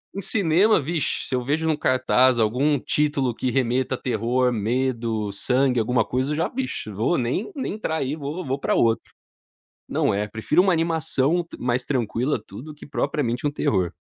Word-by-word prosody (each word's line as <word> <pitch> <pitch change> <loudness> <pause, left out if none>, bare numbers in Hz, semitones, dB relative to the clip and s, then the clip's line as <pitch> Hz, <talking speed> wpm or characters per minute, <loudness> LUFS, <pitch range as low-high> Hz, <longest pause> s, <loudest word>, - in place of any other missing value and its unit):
Em 200 - -3
cinema, 195 +2 +3
vixe, 155 +1 -2
se - - -5
eu 125 -1 0
vejo 155 +5 0
em - - +3
um - - +1
cartaz 130 -2 +3
algum 130 +7 +2
título 140 -5 0
que 130 - -2
remeta 130 +1 0
a - - -8
terror, 125 +1 0
medo, 115 -2 -1
sangue, 125 +4 +1
alguma 115 0 +1
coisa, 130 +4 -1
eu - - -1
já, 160 - 0
vixe, 260 - -4 0.3
nem 130 - -2
nem 265 - -3
entrar 210 -7 -3
aí, 140 0 -2
vou 155 +4 -5
vou 135 +1 -2
para - - 0
outro, 115 -1 +1 0.8
não, - - +1
é, 105 +1 0
prefiro 110 - +1
uma 190 -1 +3
animação 165 -1 +1
t 170 - -12
mais 125 +1 0
tranquila, 125 0 -1
tudo, 130 +10 -9
que 150 - -13
propriamente 125 -1 -1
um 145 - +1
terror. 95 - 0
130 Hz, 185 wpm, -23 LUFS, 120-155 Hz, 0.8 s, cinema